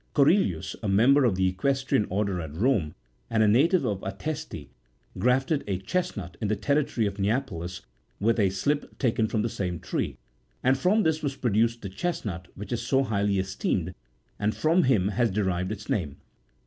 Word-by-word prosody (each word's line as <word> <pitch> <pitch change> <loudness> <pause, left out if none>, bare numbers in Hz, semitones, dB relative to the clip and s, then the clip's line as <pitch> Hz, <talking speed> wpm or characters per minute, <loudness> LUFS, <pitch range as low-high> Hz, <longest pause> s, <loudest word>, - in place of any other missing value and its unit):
Corellius, 140 - +3
a 110 - -2
member 125 +8 +5
of 110 -6 +2
the 95 0 +2
Equestrian 130 +4 0
order 95 -2 -1
at 80 -2 -7
Home, 100 - +1 0.3
and 110 -1 +3
a - - +4
native 150 - +4
of 100 -3 -1
Ateste, 100 - -5 0.5
grafted 135 +4 +2
a 95 -2 0
chesnut, 95 - -3
in 105 - 0
the 110 - +1
territory 130 +1 0
of 100 0 -3
Neapolis, 95 -5 -2 0.4
with 115 +3 +2
a 100 -2 +4
slip 145 +10 -2
taken 115 -4 +1
from 110 -1 -1
the - - +1
same 90 -5 -3
tree, - - -3 0.5
and 130 +1 +4
from 185 +11 +2
this 160 -2 +1
was 140 -3 -2
produced 115 -1 +1
the - - -3
chesnut 95 - -3
which 105 +4 -8
is 120 - -1
so 135 0 +2
highly 100 -4 0
esteemed, 95 -2 -1 0.5
and 105 +1 0
from 165 +3 +3
him 105 -7 +3
has 115 +3 +1
derived 95 -2 -1
its 105 -1 -6
name. 90 - -2
110 Hz, 175 wpm, -27 LUFS, 95-135 Hz, 0.5 s, member